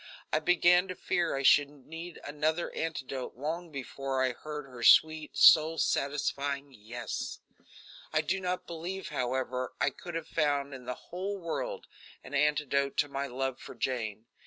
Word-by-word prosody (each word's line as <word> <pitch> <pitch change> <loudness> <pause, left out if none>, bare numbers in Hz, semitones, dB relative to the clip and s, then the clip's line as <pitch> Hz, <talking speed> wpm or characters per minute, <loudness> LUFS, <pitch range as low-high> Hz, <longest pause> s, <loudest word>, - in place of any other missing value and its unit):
I - - +4
began 180 +1 +4
to 185 - -5
fear 175 -3 0
I 135 - -2
should 145 +1 +6
need 160 +4 -9
another 155 +3 -1
antidote 135 -5 -4
long 160 +6 -4
before 135 -1 -2
I 130 - +2
heard 150 +3 -7
her 125 -3 -11
sweet 155 +4 +5
soul 160 +1 +7
satisfying 140 -1 -1
"yes." 115 +1 -5 0.7
I - - +3
do 190 +2 -1
not 180 0 -2
believe, 175 +3 -5
however, 130 0 -2
I - - +2
could 175 -2 -8
have 165 -1 -3
found 145 -2 0
in 130 -2 -9
the 125 0 -3
whole 195 +3 -5
world 170 -3 -4 0.4
an 130 - -11
antidote 140 -1 +1
to 145 - +2
my 140 0 -2
love 130 0 -3
for - - -10
Jane. 110 -4 -2
145 Hz, 160 wpm, -30 LUFS, 130-165 Hz, 0.7 s, soul